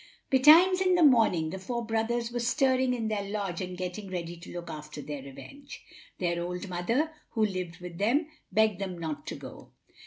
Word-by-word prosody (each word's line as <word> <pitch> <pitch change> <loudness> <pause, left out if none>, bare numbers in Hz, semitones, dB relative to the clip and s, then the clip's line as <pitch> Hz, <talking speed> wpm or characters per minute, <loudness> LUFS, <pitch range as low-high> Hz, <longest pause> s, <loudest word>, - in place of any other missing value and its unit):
Betimes 325 +8 +7
in 370 -1 +4
the 350 - +4
morning, 220 - +4
the 190 - -5
four 235 +4 -4
brothers 230 +1 -1
were 240 - -2
stirring 260 +1 +2
in 225 -2 -2
their 215 -2 -1
lodge 200 -4 -3
and 180 -1 -5
getting 185 +2 -5
ready 175 -2 -4
to 170 +1 -11
look 175 -1 -7
after 150 -2 -8
their 145 -1 -6
revenge. 275 - -11 0.3
Their 170 -1 -1
old 180 +2 -4
mother, 230 - 0 0.2
who 220 -2 +2
lived 185 -4 -4
with 175 -1 -8
them, 250 +10 +2 0.3
begged 215 -1 +3
them 185 -2 -4
not 160 -3 -5
to - - -4
go. - - -11
200 Hz, 190 wpm, -29 LUFS, 175-240 Hz, 0.3 s, Betimes